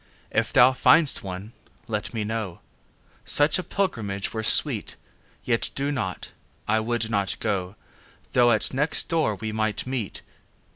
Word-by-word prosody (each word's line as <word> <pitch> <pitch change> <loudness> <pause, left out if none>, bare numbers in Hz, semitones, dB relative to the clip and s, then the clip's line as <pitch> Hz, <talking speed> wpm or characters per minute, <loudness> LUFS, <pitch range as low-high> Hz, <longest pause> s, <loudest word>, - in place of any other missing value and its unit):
If 115 0 0
thou 130 0 +6
find'st 150 +3 +4
one 95 +3 -7 0.4
let 105 -2 -3
me 110 -3 -3
know; 105 -4 -4 0.6
Such 145 +4 +3
a - - -3
pilgrimage 105 - -2
were 110 - -3
sweet. 110 - +3 0.5
Yet 115 -2 0
do 140 +1 -1
not; 95 -10 -4 0.4
I 110 - +2
would 115 0 -2
not 100 -2 -1
go, 100 -3 -2 0.6
Though 120 -1 +5
at 110 - +2
next 150 +4 +1
door 155 -10 +1
we 110 +2 -5
might 110 -1 -2
meet. 125 -6 -4
110 Hz, 145 wpm, -24 LUFS, 105-130 Hz, 0.6 s, thou